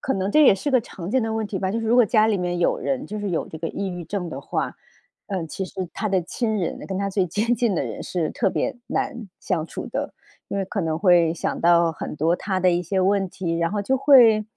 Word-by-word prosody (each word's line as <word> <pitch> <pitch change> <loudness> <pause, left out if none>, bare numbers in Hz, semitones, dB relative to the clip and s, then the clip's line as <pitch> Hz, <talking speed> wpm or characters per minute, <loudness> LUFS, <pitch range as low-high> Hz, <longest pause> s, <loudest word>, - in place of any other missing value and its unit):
可 265 - -1
能 190 +1 -1
这 305 +5 +5
也 205 - +7
是 285 +9 -3
个 255 - +5
常 185 0 -8
见 260 0 +2
的 225 0 -2
问 220 -1 -1
题 200 -2 -4
吧， 190 0 -1
就 225 +2 -1
是 225 - -3
如 230 - +3
果 245 - +7
家 215 0 +3
里 215 -2 +2
面 175 -1 -2
有 175 - +2
人， 270 +1 -2
就 215 - -5
是 205 -2 -3
有 165 - -2
这 160 - -8
个 165 - -4
抑 200 - -4
郁 175 -2 -6
症 185 -3 -4
的 - - -6
话， - - -3 0.5
呃， 185 -5 -3
其 190 +5 -4
实 185 -1 -5
她 215 - -2
的 190 -2 +2
亲 220 +5 -2
人， 175 - -2
跟 190 -1 -3
她 200 0 -1
最 190 -2 0
接 220 +7 0
近 230 -4 +1
的 160 - 0
人 115 -5 -5
是 170 -4 -2
特 200 -5 0
别 - - -2
难 235 -3 -2
相 170 -5 -1
处 - - -7
的。 - - -4 0.4
因 200 - -3
为 195 - 0
可 195 0 -3
能 160 0 -1
会 175 -3 +4
想 - - -3
到 170 0 +4
很 155 - -6
多 165 +4 +2
她 190 -2 -2
的 180 0 +4
一 175 +1 +1
些 190 +3 -1
问 195 +1 +2
题， 170 -3 -3
然 170 +1 0
后 205 - -1
就 265 +6 +1
会 240 -6 +6
190 Hz, 290 characters per minute, -23 LUFS, 175-215 Hz, 0.5 s, 也